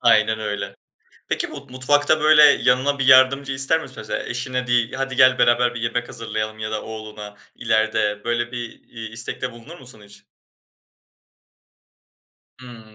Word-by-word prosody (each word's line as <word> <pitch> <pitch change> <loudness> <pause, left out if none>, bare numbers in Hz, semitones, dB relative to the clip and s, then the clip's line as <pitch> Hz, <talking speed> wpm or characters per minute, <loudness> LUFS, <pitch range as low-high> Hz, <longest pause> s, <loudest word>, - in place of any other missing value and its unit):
Aynen 110 -2 +3
öyle. 105 -1 -5 0.5
Peki, - - -1
bu - - -10
mutfakta, 145 +4 +1
böyle, 155 0 +6
yanına 140 0 +3
bir 135 - -1
yardımcı 135 +1 +5
ister 135 +5 +1
misin? 135 -5 -10
Mesela 110 - -4
eşine 125 +1 -3
deyip, 120 0 0
"Hadi 135 -1 -3
gel, 130 0 +5
beraber 120 0 +2
bir 120 - -6
yemek 120 +1 -2
hazırlayalım." 110 -1 -5
ya 110 0 -5
da 110 -1 -4
oğluna 110 -2 -9 0.2
ileride, 105 -1 -1
böyle, 120 0 -2
bir, 120 -2 -7
iii, 115 -1 -9
istekte 115 +3 -3
bulunur 125 +9 -13
musun 125 -5 -13
hiç? 105 0 -16 2.3
Hımm, 115 -4 -14
120 Hz, 150 wpm, -21 LUFS, 110-130 Hz, 2.3 s, böyle